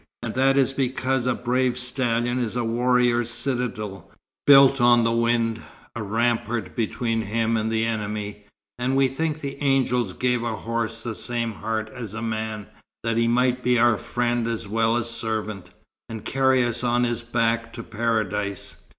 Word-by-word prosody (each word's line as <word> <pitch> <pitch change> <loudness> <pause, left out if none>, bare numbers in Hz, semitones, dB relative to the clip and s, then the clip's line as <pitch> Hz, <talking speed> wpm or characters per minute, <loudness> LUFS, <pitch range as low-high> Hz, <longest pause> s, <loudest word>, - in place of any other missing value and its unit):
And 115 -2 -3
that 135 +1 +3
is 135 -1 +3
because 130 -1 0
a 125 - +2
brave 125 0 0
stallion 120 -1 0
is 120 -2 -2
a 120 - 0
warrior's 120 0 +2
citadel, 120 - -3 0.4
built 135 -2 +7
on 120 -1 +5
the 115 - +2
wind, 115 -1 +1 0.3
a 115 - -4
rampart 115 +2 -1
between 115 0 -1
him 115 +2 0
and 110 0 -1
the 110 0 +1
enemy. 105 -2 -4 0.3
And 130 +2 0
we 135 0 +4
think 155 +3 -2
the 140 0 -6
angels 125 -7 +1
gave 125 +1 0
a 115 -1 -2
horse 115 +1 -3
the 120 - -3
same 115 0 -2
heart 110 +1 -3
as 115 -5 -7
a 110 - -4
man, 110 -2 -3 0.4
that 115 0 0
he 115 0 +2
might 125 +1 +2
be 125 0 +2
our 120 -1 +4
friend 120 -1 -1
as 115 -3 -3
well 115 +2 +1
as 120 -1 -1
servant, 110 -5 -3 0.4
and 110 -2 -7
carry 130 -1 +3
us 120 +1 -3
on 120 0 +2
his 120 -1 -1
back 115 -1 0
to 115 - -7
Paradise. 110 -3 -2
115 Hz, 170 wpm, -24 LUFS, 110-125 Hz, 0.4 s, built